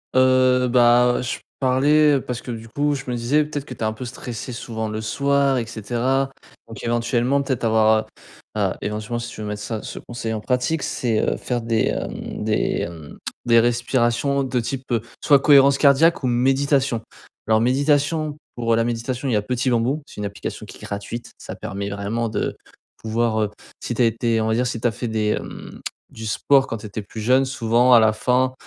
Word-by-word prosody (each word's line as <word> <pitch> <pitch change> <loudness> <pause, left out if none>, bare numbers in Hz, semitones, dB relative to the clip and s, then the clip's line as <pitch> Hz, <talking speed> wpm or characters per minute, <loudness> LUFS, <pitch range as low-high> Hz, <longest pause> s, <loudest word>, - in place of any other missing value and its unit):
Heu, 130 -1 +4
bah, 120 0 +5
heu, - - -2
je 125 - -3 0.2
parlais 145 +2 +4
parce 125 -1 -5
que 125 - -6
du 115 -1 -7
coup, 145 +4 0
je 135 -1 -5
me 125 - -1
disais, 130 +6 +2
peut-être 145 -2 -5
que 130 - -8
tu 120 - -16
es - - -3
un 110 0 0
peu 125 +3 -7
stressé 120 0 -6
souvent 110 -2 -4
le 110 0 -4
soir 140 +3 +1
et 120 - -1
cetera. 120 +5 -1 0.4
Donc 115 - -10
éventuellement 120 +3 +1
peut-être 130 -4 -2
avoir, 110 -1 +3 0.5
heu, - - 0
heu, - - +1
éventuellement 105 +3 -3
si 120 0 -5
tu 115 - -9
veux 105 - -4
mettre 105 0 -4
ça 110 0 -4
ce - - -8
conseil 115 -2 -5
en 110 - -2
pratique, 125 +7 0
c'est, 115 -4 0
heu, - - +1
faire 120 -1 -2
des 115 -2 +1
hem, - - -4
des 110 - 0 0.3
hem, 80 -3 -7 0.3
des 115 -1 +6
respirations 120 +3 +1
de 130 -1 -1
type, 130 +3 -4
heu, 115 -2 +2 0.2
soit 140 -2 +6
cohérence 140 -1 +6
cardiaque 150 +4 +5
ou - - +1
méditation. 135 0 +2 0.5
Alors 110 0 +4
méditation, 145 +4 +1 0.2
pour 115 -1 +1
la 115 - +2
méditation, 120 +3 -3
il 130 - 0
y - - +3
a 105 - +2
Petit 125 +4 -1
Bambou. 125 +6 +1
C'est - - -15
une 105 - -3
application 100 0 -6
qui - - -11
est - - -18
gratuite, 105 +4 -6
ça - - -8
permet 100 +1 -5
vraiment 100 +4 -2
de 110 - -2 0.4
pouvoir, 110 0 0
heu, 105 - 0 0.3
si 120 - -3
tu 125 - 0
as - - +5
été, 115 0 +1
on 110 - 0
va 110 - +1
dire, 125 +2 +1
si 115 - -3
tu 120 - +1
as - - +1
fait 120 +3 -5
des 110 -1 0
hem, - - -9 0.3
du 110 0 -8
sport 135 +5 +3
quand 115 - -4
tu 105 - -11
étais 105 +1 -5
plus 110 +2 -8
jeune. 130 +5 +4
Souvent 125 -1 +3
à 120 - +9
la 110 -1 +4
fin, 125 +3 +1
120 Hz, 215 wpm, -22 LUFS, 110-130 Hz, 0.5 s, à